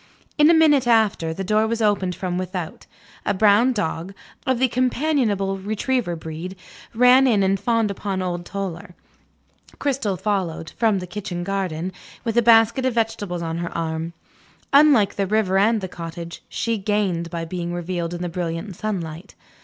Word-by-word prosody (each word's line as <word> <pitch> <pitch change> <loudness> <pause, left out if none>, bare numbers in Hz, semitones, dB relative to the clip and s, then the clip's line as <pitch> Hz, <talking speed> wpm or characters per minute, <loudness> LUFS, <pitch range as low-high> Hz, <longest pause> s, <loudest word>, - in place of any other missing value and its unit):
In 300 +1 +7
a - - +7
minute 295 -5 +4
after, 215 -8 +3
the 190 +4 -4
door 215 +3 +2
was 230 +1 -2
opened 200 -4 +1
from 180 -1 -3
without. 180 -3 -5 0.4
A - - 0
brown 215 +5 +5
dog, 185 -3 -3 0.3
of 260 -1 +2
the 260 +2 +3
companionable 245 -6 0
retriever 215 0 -1
breed, 160 +3 -7 0.4
ran 250 +3 +6
in 210 -5 +3
and 195 0 +2
fawned 225 0 +1
upon 195 -1 -3
old 175 -2 -3
Toller. 180 -2 -6 0.8
Cristel 260 -9 -1
followed 180 -5 -2
(from 220 -4 +1
the 180 - -4
kitchen 180 -1 -5
garden), 185 -2 -2 0.3
with 230 -2 -2
a 240 - +5
basket 230 +2 +5
of 255 -2 0
vegetables 210 -6 -1
on 165 0 -3
her 170 0 -3
arm. 165 0 -3 0.6
Unlike 280 -8 +5
the 195 -1 0
river 200 -2 +2
and 220 +2 +3
the 190 - -3
cottage, 170 -1 -8
she 230 -2 -1
gained 190 -4 -1
by 170 -1 -4
being 175 0 -4
revealed 175 0 -3
in 175 - -5
the - - -1
brilliant 175 +2 -4
sunlight. 180 -4 -5
195 Hz, 165 wpm, -22 LUFS, 175-225 Hz, 0.8 s, In